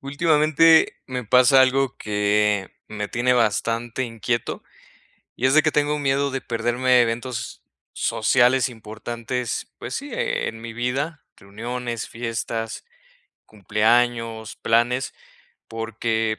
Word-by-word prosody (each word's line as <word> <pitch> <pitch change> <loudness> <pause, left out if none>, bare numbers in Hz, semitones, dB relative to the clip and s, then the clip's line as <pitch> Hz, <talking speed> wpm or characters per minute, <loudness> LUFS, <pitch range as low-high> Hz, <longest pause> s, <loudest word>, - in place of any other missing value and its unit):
Últimamente, 155 +2 +4
me 125 -2 -4
pasa 125 +3 +5
algo 130 0 +2
que 105 -1 0 0.2
me 105 -1 -4
tiene 125 +3 +1
bastante 115 +1 0
inquieto 120 -1 -3 0.7
y 125 - -1
es 130 - +4
de 155 - +6
que 155 - +1
tengo 150 0 +1
un 150 - -4
miedo 140 0 +1
de 135 0 -3
perderme 120 +2 +2
eventos 120 0 -3 0.3
sociales 125 +2 +2
importantes, 115 +2 -5
pues, 120 - -7
sí, 285 +1 -5
e 485 +1 -1
en 115 - -6
mi 115 0 -8
vida, 135 +6 -3
reuniones, 115 +4 -5
fiestas, 115 -1 -4 0.6
cumpleaños, 110 +2 0
planes, 120 +3 +1 0.6
porque 115 -1 -2
120 Hz, 115 wpm, -23 LUFS, 115-130 Hz, 0.7 s, de